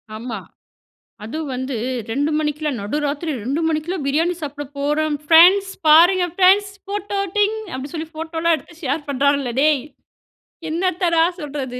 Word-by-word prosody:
ஆமா. 225 -1 -5 0.9
அதுவும் 300 +6 -5
வந்து 260 0 -3 0.4
2 285 +5 0
மணிக்குள்ள 300 0 -1
நடு 205 +7 -3
ராத்திரி 290 +3 -2
2 275 +6 -1
மணிக்குள்ள 320 +3 -2
பிரியாணி 325 +6 +1
சாப்பிட 290 -1 -5
போறோம் 295 +1 0
ஃபிரெண்ட்ஸ், 360 +5 +6 0.2
பாருங்க 350 +4 +6
ஃபிரெண்ட்ஸ். 390 +2 +4 0.2
போட்டோ 405 0 -3 0.2
ட்டிங் 420 +1 +2 0.2
அப்டினு 265 +2 -6
சொல்லி 320 -1 -4
போட்டோல்லாம் 325 +1 0
எடுத்து 330 +3 -15
ஷேர் 285 +1 -2
பண்றாங்களே! 280 -2 +1
டேய், 295 -2 +3 0.9
என்னத்தடா 340 0 +1 0.2
சொல்றது 275 -5 -5
310 Hz, 130 wpm, -20 LUFS, 280-345 Hz, 0.9 s, ஃபிரெண்ட்ஸ்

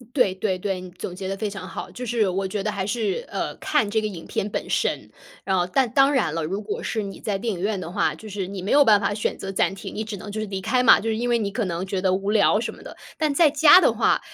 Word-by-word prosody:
对 205 -9 +3
对 190 -1 -1
对， 190 0 -2
你 180 0 -9
总 180 0 -7
结 190 0 -6
得 195 - -3
非 210 +1 -3
常 195 -2 -7
好， - - -7
就 250 - -7
是 225 -3 +1
我 190 +1 -1
觉 195 +1 -3
得 215 - -1
还 195 -2 -3
是， 230 - -1
呃， - - -3
看 295 -9 0
这 220 +1 +1
个 215 - -2
影 180 -6 -7
片 200 - -2
本 - - -4
身。 - - -1 0.3
然 190 - +1
后， 175 -1 +1
但 250 +7 +1
当 275 +2 +5
然 240 - +1
了， 165 -1 -2
如 195 +7 -3
果 - - -4
是 220 - -2
你 195 -1 -7
在 205 -2 -2
电 225 +3 -2
影 175 - -7
院 205 +1 -1
的 170 - -6
话， 155 -3 0
就 215 +7 -11
是 195 -2 -4
你 190 -1 -6
没 195 - -4
有 290 0 +6
办 210 -5 +5
法 205 0 0
选 210 - -2
择 195 - -6
暂 195 - +1
停， - - -8
你 220 - -3
只 215 -1 -6
能 205 +2 -9
就 215 +1 -4
是 215 - -3
离 195 -1 -4
开 250 +6 +1
嘛， 245 - +7
就 225 - -3
是 220 - -1
因 240 +2 -2
为 240 -1 +3
你 205 -3 -2
可 225 +3 -2
能 175 -1 -3
觉 190 0 -2
得 185 -1 +2
无 195 +2 -1
聊， 210 -1 +4
什 - - -3
么 - - -14
的。 - - -10 0.2
但 310 -2 +1
在 310 +1 +5
家 310 +4 +7
的 - - +4
话， - - +2
205 Hz, 330 characters per minute, -23 LUFS, 190-225 Hz, 0.3 s, 嘛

